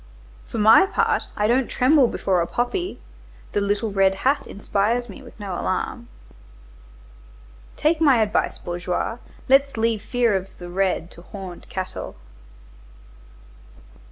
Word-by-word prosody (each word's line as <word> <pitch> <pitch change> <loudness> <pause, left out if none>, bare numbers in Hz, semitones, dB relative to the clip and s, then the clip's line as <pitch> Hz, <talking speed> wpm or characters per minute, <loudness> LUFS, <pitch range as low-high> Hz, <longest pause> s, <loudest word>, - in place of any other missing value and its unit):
For - - -6
my 220 - +7
part - - 0
I 210 - +1
don't 245 +3 +2
tremble 265 0 +4
before 185 -5 0
a 170 - -1
poppy, 350 - -2 0.5
the 205 - 0
little 205 +2 0
red 195 -1 +3
hat 275 +2 +2
inspires 210 +4 -1
me 215 +5 -11
with 245 -3 -15
no 200 -3 -5
alarm. - - -3 1.7
Take 315 +1 +1
my 275 -6 +5
advice, 210 - -1
bourgeois, 180 +6 -3 0.3
let's 275 -1 +4
leave 225 -1 +1
fear 235 -2 +1
of 190 0 -2
the 175 -1 -9
red 185 -2 -1
to 170 - -13
horned 185 -1 -10
cattle." 185 -1 -5
210 Hz, 130 wpm, -23 LUFS, 190-245 Hz, 1.7 s, my